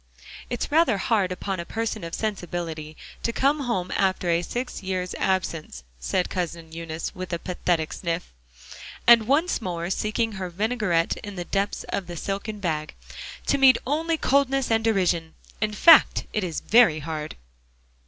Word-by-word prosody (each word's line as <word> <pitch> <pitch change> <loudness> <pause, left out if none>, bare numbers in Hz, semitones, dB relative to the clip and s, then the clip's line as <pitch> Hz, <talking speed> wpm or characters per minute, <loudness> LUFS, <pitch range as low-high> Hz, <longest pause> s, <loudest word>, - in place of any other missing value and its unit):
"It's 245 +3 -3
rather 305 -8 +4
hard 195 -2 +1
upon 185 +1 -3
a - - -2
person 220 +1 -3
of 165 0 -4
sensibility, 170 -7 -4 0.2
to 230 - 0
come 280 +5 +2
home 190 -10 -2
after 185 -2 +1
a 170 0 +2
six 245 +8 -4
years' 185 -1 -3
absence," 165 - -1 0.2
said - - 0
Cousin 170 -3 -4
Eunice 165 0 -5
with 185 0 -7
a - - +1
pathetic 175 -2 -1
sniff, 170 - -4 0.7
and 230 -2 +7
once 310 +5 +2
more 175 -2 -3
seeking 220 +3 0
her 190 -3 -5
vinaigrette 195 -3 0
in 205 -1 -8
the 175 -1 -5
depths 200 +2 -1
of 190 - -3
the 175 -1 -7
silken 200 +4 -4
bag, 155 -5 -3 0.5
"to 280 - +2
meet 265 -2 +7
only 320 +5 0
coldness 270 -3 +2
and 225 0 +2
derision. 180 -7 +1 0.3
In 215 -1 +1
fact, 330 +8 +6
it 215 - 0
is 170 -3 -3
very 225 -9 +5
hard." 155 0 -5
190 Hz, 160 wpm, -25 LUFS, 170-225 Hz, 0.7 s, and